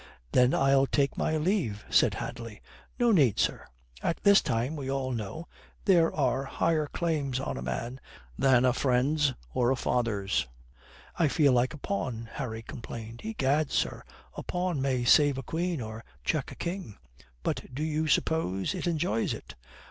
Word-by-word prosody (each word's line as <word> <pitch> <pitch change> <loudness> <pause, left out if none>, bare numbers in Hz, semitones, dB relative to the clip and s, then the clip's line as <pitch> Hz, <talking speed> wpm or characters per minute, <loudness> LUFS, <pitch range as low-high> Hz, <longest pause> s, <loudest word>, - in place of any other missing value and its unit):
"Then 125 +1 +4
I'll 135 0 +4
take 140 -1 +1
my 155 - 0
leave," 155 - -1
said - - +4
Hadley. 115 -2 -6 0.4
"No 240 -2 +3
need, 140 - +4
sir. - - 0 0.3
At - - 0
this 200 -1 +7
time, 120 +7 -1
we 135 -3 -5
all 135 -1 -1
know, 120 - -5 0.4
there 170 -4 +5
are 135 -2 0
higher 155 +1 0
claims 145 -6 -1
on 135 - -3
a 60 - -5
man 65 - -4 0.4
than 130 - +4
a 125 - +4
friend's 135 +2 +2 0.2
or 120 -1 +2
a 135 - +3
father's." 100 - 0 0.7
"I 165 - +3
feel 145 -2 +3
like 125 +3 +2
a - - -9
pawn," 125 - -3
Harry 115 -5 -5
complained. 115 -3 -8
"Egad, 155 -9 0
sir, - - -1 0.3
a - - -5
pawn 180 -5 -2
may 130 -2 0
save 145 +2 +5
a 135 - -4
queen 170 -1 -2
or 110 0 -7 0.2
check - - -1
a - - -9
king." 170 - -5 0.5
"But - - -2
do 140 +4 -4
you 155 0 0
suppose 125 - +1
it 185 -1 -3
enjoys 145 -10 0
it?" - - -11
135 Hz, 165 wpm, -29 LUFS, 120-160 Hz, 0.7 s, this